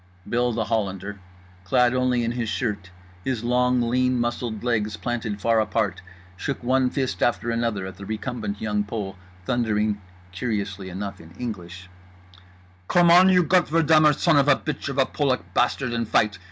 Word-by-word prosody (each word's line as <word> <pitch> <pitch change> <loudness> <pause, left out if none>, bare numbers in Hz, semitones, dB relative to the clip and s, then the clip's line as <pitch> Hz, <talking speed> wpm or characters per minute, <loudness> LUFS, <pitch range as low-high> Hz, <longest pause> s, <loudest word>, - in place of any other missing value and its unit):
Bill 120 +1 +1
The 115 -1 -1
Hollander, 100 -2 -3 0.4
clad 125 +5 +3
only 125 -1 +1
in 115 - 0
his 120 -2 -3
shirt, 105 -6 -3 0.3
his 125 -2 -2
long 125 +1 +2
lean 125 +1 +1
muscled 120 -2 -2
legs 110 -4 0
planted 115 -4 -3
far 115 +2 +2
apart, 105 -2 -1 0.3
shook 135 +7 -4
one 130 +1 +2
fist 130 -1 -2
after 120 0 +1
another 115 -4 -1
at 95 -2 -8
the 100 - -9
recumbent 110 -2 -4
Young 105 -1 -1
Pole, 105 -2 -5 0.3
thundering 105 -3 0 0.3
(curiously 100 -2 -3
enough 100 0 -6
in 85 +1 -15
English): 90 -6 -6 1.0
"Come 175 -1 +5
on 180 +2 +7
you 180 -1 +5
Gottverdummer 160 -3 +4
son 165 -4 +3
of 140 0 +4
a 145 - +6
bitch 155 -1 -4
of 140 - -5
a 135 - +4
Polak 135 -3 -1
bastard 125 0 +1
and 115 -1 -1
fight! 105 -2 +2
115 Hz, 165 wpm, -24 LUFS, 105-125 Hz, 1.0 s, on